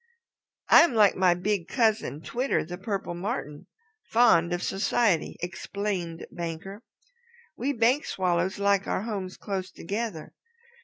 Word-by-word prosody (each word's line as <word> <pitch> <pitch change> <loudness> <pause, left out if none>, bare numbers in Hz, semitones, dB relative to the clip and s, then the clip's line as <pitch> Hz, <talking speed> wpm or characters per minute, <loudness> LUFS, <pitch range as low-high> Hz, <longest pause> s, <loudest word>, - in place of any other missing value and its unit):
"I - - +9
am 335 -8 +3
like 210 -3 +5
my 185 -2 +4
big 185 -1 -1
cousin, 220 - 0
Twitter 250 - -1
the 180 +2 -7
Purple 195 -3 -3
Martin, 175 - -5 0.4
fond 200 -8 +4
of 175 0 -2
society," 195 -2 +1
explained 180 -1 -4
Banker. 175 +5 -6 0.7
"We 275 +2 -1
Bank 245 +4 +2
Swallows 180 +1 0
like 200 -1 +2
our 190 - -1
homes 195 -5 -5
close 190 -2 -4
together. 200 -2 -5
195 Hz, 125 wpm, -27 LUFS, 175-220 Hz, 0.7 s, I